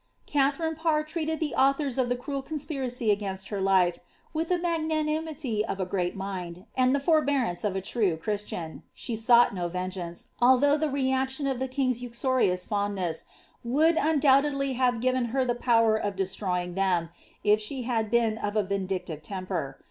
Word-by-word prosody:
"* - - -42
Katharine 290 +3 +1
Parr 315 -1 +1
treated 315 0 -3
the 310 -3 -2
authors 275 -1 +2
of 250 -2 +1
the 245 - +1
cruel 275 +2 -4
conspiracy 270 -6 -2
against 195 -2 -2
her 200 -2 -3
life, 190 -2 +3 0.3
witli 330 +3 0
tlie - - -7
magnanimity 310 -7 -1
of 195 - -4
a 185 - 0
great 180 -1 -2
mind, 185 -2 -6
and 255 +1 +3
the - - +1
forbearance 280 - +1
of 205 -3 -1
a 190 - -1
true 195 -4 0
Christian. 180 -3 -4
She 235 - -3
sought 235 +1 +5
no 175 -2 -2
vengeance, 180 -1 -5
although 260 +4 +5
the 305 0 0
reaction 265 0 0
of 265 -2 -1
tlie 265 0 -2
king's 255 -2 0
uxorious 240 -6 0
fondness 200 -5 -1 0.4
would 305 +8 +3
undoubtedly 275 -2 +3
have 245 -2 +1
given 255 0 +1
her 255 +3 0
the 245 - +1
power 230 -2 +3
of 205 -2 -2
destroying 185 -2 -2
them, 180 -3 +1 0.3
if 210 +1 +4
she 255 +4 -3
had 225 -3 -1
been 225 -1 +2
of 205 0 -3
a 215 - +3
vindictive 190 -5 -3
temper. 180 -6 -4
240 Hz, 170 wpm, -27 LUFS, 195-275 Hz, 0.4 s, sought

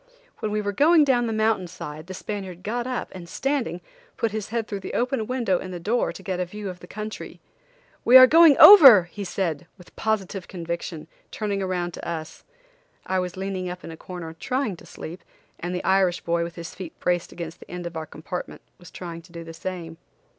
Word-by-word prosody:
When 215 - -2
we 210 0 0
were 205 -1 -2
going 305 - +5
down 245 -4 +2
the - - -2
mountain 215 -4 +1
side 155 -1 -8
the 185 - -7
Spaniard 190 -3 -6
got 240 +3 -2
up, 255 -1 -3
and 175 -2 -10
standing, 260 -6 -2 0.4
put 230 - 0
his 215 -1 -4
head 225 -1 -2
through 200 - -4
the 190 - -6
open 245 -2 0
window 235 -8 0
in 185 - -7
the 180 -1 -6
door 225 +8 0
to - - -11
get 185 -3 -3
a 180 - 0
view 205 +2 -7
of 180 -1 -8
the 180 - -13
country. 215 +2 -7 0.6
"We 250 +2 +9
are 255 - +11
going 320 +1 +7
over," 270 - +11
he 200 +4 -8
said, 175 -4 -3
with 180 - -17
positive 200 -3 -2
conviction, 170 -2 -5 0.2
turning 205 -2 -2
around 180 -2 -2
to - - -8
us. 160 -2 -6 0.6
I 190 0 0
was 180 0 -4
leaning 190 -1 -3
up 180 +1 -7
in - - -8
a - - -8
corner 170 -1 -8
trying 240 +4 -2
to - - -15
sleep 170 +3 -9 0.4
and 175 +1 -3
the 180 - -3
Irish 190 -2 +2
boy, 170 0 0
with 170 0 -6
his 170 -1 -8
feet 180 -4 -9
braced 175 -1 0
against 165 -1 -7
the - - -15
end 180 0 -6
of 170 - -5
the 160 -1 -4
compartment, 175 +5 -7 0.2
was 175 0 -13
trying 170 -2 -8
to 170 +1 -19
do 170 -1 -8
the 165 0 -9
same. 165 -1 -6
185 Hz, 220 wpm, -24 LUFS, 175-215 Hz, 0.6 s, are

